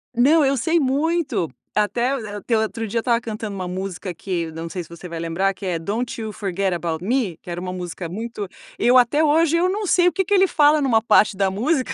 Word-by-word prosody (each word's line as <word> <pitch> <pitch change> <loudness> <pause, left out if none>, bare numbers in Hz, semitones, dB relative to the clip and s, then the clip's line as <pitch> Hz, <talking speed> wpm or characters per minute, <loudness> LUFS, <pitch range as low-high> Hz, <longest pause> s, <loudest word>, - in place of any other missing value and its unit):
Não, 290 +6 +5
eu 275 0 +2
sei 325 +7 +2
muito 290 - 0 0.3
até 235 +5 +1
o 225 - -6
a 205 0 -6
até 225 +3 0
o 220 - +2
outro 225 0 -3
dia 230 +3 -1
estava 235 0 +1
cantando 215 -3 -5
uma 185 -1 -4
música, 185 0 -5
que 170 -2 -3
não 165 +1 -6
sei 180 +1 -5
se - - -17
você 170 +1 -9
vai 165 -1 -6
lembrar, 170 +4 0
que 200 - -15
é 180 -2 -1
"Don't 215 +9 -3
You 220 -1 -4
Forget 195 -2 -1
About 170 -1 -3
Me", 225 -8 0
que 175 - -9
era 175 +1 -4
uma 185 - -4
música 180 -1 -6
muito 215 +1 -5 0.3
eu 250 +1 +5
até 250 +6 +4
hoje 320 +2 +3
eu 360 +2 +2
não 410 +2 -2
sei 355 0 +4
o 360 - +4
que 385 0 -1
que 410 - 0
ele 385 -1 +5
fala 300 -1 +4
numa 230 -5 +2
parte 210 -4 +4
da 195 -1 +2
música, 260 +7 0
220 Hz, 245 wpm, -22 LUFS, 185-275 Hz, 0.3 s, Não